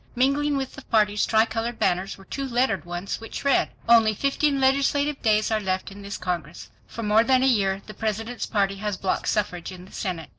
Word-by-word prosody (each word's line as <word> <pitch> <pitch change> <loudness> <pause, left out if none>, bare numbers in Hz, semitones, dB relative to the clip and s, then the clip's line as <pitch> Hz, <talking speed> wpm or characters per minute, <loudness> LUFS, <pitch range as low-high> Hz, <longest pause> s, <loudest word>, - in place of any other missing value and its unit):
Mingling 280 +3 +2
with 265 -1 -4
the - - -10
party's 210 -4 +2
tri 220 0 +4
colored 230 +1 -3
banners 185 +2 0
were 195 - -15
two 275 +6 -4
lettered 240 -6 +1
ones 175 +5 -4
which 225 - -7
read: 280 - +3 0.2
ONLY 225 -2 +5
FIFTEEN 275 +3 +1
LEGISLATIVE 280 +2 +2
DAYS 215 -1 +2
ARE 220 - +2
LEFT 190 -1 -2
IN 200 +1 -11
THIS 200 0 -6
CONGRESS. 170 -3 -5 0.2
FOR 230 - -7
MORE 210 +1 +4
THAN 260 +1 +3
A - - +4
YEAR 195 -6 +2
THE 215 - -9
PRESIDENT'S 225 +2 -3
PARTY 195 -2 0
HAS 205 -1 -3
BLOCKED 190 - -2
SUFFRAGE 180 -5 -1
IN 180 -1 -10
THE 190 - -17
SENATE. 175 -6 -4
220 Hz, 210 wpm, -25 LUFS, 195-255 Hz, 0.2 s, ONLY